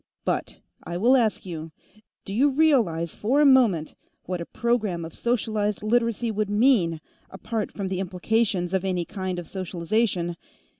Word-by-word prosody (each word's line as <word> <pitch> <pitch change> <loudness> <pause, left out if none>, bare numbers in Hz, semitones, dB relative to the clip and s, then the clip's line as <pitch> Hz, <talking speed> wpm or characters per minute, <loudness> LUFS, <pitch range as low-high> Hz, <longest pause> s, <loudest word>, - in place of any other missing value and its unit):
But - - -2 0.3
I 175 +1 -4
will 240 +8 +4
ask 225 -6 +1
you, 165 -3 -6 0.5
do 195 - -5
you 270 +7 +4
realize, 240 - +2
for 255 +7 +1
a 300 - +5
moment, 230 - +4 0.3
what 180 -1 -4
a 170 - -6
program 215 -8 -1
of 165 - -9
socialized 215 -4 -1
Literacy 230 0 +1
would 215 -1 -1
mean, 205 - +3 0.3
apart 210 +3 -4
from 200 -2 -4
the 185 -1 -2
implications 190 0 0
of 190 -1 +1
any 180 -3 -1
kind 185 -1 -4
of 175 -2 -6
socialization? 180 -1 -1
200 Hz, 155 wpm, -25 LUFS, 175-230 Hz, 0.5 s, a